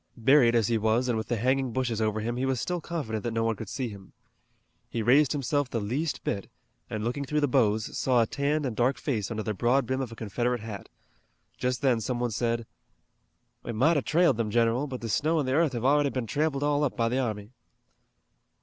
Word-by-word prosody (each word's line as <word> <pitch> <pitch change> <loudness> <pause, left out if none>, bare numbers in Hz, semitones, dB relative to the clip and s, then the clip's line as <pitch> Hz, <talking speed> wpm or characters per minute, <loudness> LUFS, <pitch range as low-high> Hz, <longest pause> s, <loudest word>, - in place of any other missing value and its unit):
Buried 120 0 +5
as 115 -3 +3
he 115 -1 +1
was 110 +4 +1
and 120 - +1
with 110 0 -3
the 120 - -1
hanging 130 +3 +1
bushes 120 -3 -1
over 110 0 0
him 120 +2 -2
he 125 - -2
was 130 -2 0
still 180 -1 -2
confident 135 -12 -4
that 120 - -2
no 115 0 0
one 115 0 +1
could 105 -1 -8
see 130 - -3
him. 100 -3 -11 0.8
He 115 - -2
raised 130 +3 +5
himself 145 -1 0
the 115 - -2
least 135 +10 -2
bit, 100 - -3 0.4
and 110 -1 -3
looking 125 +5 -2
through 150 +2 -1
the 145 - +3
boughs, 110 -5 +1
saw 125 -3 +3
a - - +1
tanned 145 +5 -1
and 125 -4 -3
dark 125 +3 +2
face 110 -5 -2
under 110 -2 -3
the 110 - -2
broad 120 +6 +2
brim 130 +3 -1
of 125 -3 -4
a - - -8
Confederate 120 +2 -2
hat. 105 -3 -8 0.7
Just 125 0 -2
then 125 -4 +3
some 120 +2 -2
one 120 -1 -1
said: 115 +1 -1 1.0
"We 115 - -5
might 140 +10 +3
have 145 - 0
trailed 165 -7 +3
'em, 110 -2 0
general, 115 +5 +2
but 130 -2 -6
the 115 - -4
snow 155 +8 +1
an' 145 - 0
the 130 - 0
earth 155 -1 +2
have 120 0 -3
already 145 +1 +4
been 130 -3 -3
tramped 145 +4 -1
all 145 0 +2
up 140 - -1
by 115 -1 +2
the 125 +3 0
army." 110 -4 -3
120 Hz, 230 wpm, -27 LUFS, 115-140 Hz, 1.0 s, Buried